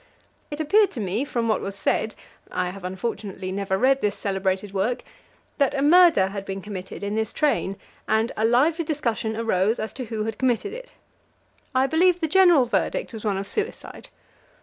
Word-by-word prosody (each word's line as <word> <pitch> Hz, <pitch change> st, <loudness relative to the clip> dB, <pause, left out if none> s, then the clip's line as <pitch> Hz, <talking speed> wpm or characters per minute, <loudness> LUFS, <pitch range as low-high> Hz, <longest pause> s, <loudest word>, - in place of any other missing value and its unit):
It 295 Hz, -, -6 dB
appeared 400 Hz, +7 st, +4 dB
to -, -, -5 dB
me, 205 Hz, +4 st, -1 dB
from 240 Hz, -5 st, -2 dB
what 220 Hz, -, +1 dB
was 195 Hz, 0 st, -4 dB
said 215 Hz, +2 st, 0 dB, 0.3 s
I 180 Hz, -1 st, -2 dB
have 195 Hz, 0 st, -11 dB
unfortunately 190 Hz, 0 st, -4 dB
never 190 Hz, 0 st, -1 dB
read 270 Hz, +4 st, +3 dB
this 210 Hz, -, 0 dB
celebrated 190 Hz, 0 st, -2 dB
work 205 Hz, +6 st, -1 dB, 0.6 s
that 280 Hz, 0 st, +2 dB
a 275 Hz, -, 0 dB
murder 325 Hz, -, +6 dB
had 200 Hz, 0 st, -5 dB
been 195 Hz, 0 st, -5 dB
committed 190 Hz, -1 st, -7 dB
in 200 Hz, +1 st, -2 dB
this 220 Hz, 0 st, -1 dB
train, 230 Hz, -9 st, 0 dB, 0.3 s
and 220 Hz, +2 st, +1 dB
a 220 Hz, -, -1 dB
lively 285 Hz, +9 st, +3 dB
discussion 235 Hz, -8 st, -2 dB
arose 220 Hz, -1 st, +1 dB
as 220 Hz, -, -3 dB
to 255 Hz, -, -5 dB
who 220 Hz, -2 st, -3 dB
had 220 Hz, 0 st, -4 dB
committed 260 Hz, -, 0 dB
it. -, -, -10 dB, 0.8 s
I 260 Hz, +1 st, +4 dB
believe 350 Hz, +5 st, +3 dB
the 320 Hz, -, 0 dB
general 350 Hz, -5 st, +5 dB
verdict 380 Hz, -, -1 dB
was 220 Hz, -, -7 dB
one 205 Hz, -3 st, 0 dB
of 195 Hz, 0 st, -4 dB
suicide. 435 Hz, +1 st, -5 dB
225 Hz, 185 wpm, -24 LUFS, 195-290 Hz, 0.8 s, murder